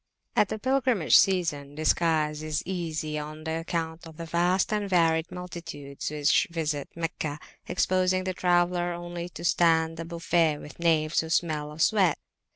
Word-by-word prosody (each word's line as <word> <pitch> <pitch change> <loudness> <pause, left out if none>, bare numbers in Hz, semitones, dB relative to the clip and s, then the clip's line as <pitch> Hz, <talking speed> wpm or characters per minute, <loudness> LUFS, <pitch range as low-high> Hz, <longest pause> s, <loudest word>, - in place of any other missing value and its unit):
At 205 - +3
the - - -3
pilgrimage 255 - +2
season 150 -7 +2
disguise 155 -1 +1
is 155 -1 -2
easy 160 -4 -3
on 155 +1 -8
account 165 0 -3
of 160 -1 -13
the 165 - -6
vast 175 +5 +1
and 205 -1 -1
varied 165 -2 +2
multitudes 170 -6 -7
which 150 0 +2
visit 155 -4 -2
Meccah 165 -3 -3 0.3
exposing 185 +1 +1
the 185 0 -2
traveller 175 0 +1
only 175 0 -6
to 170 - -10
stand 165 -1 +3
the 165 - -5
buffet 165 -2 +1
with 150 - -12
knaves 160 -2 +2
who 160 - -2
smell 155 -3 0
of 155 +1 0
sweat. 195 -7 +3
165 Hz, 155 wpm, -27 LUFS, 155-175 Hz, 0.3 s, At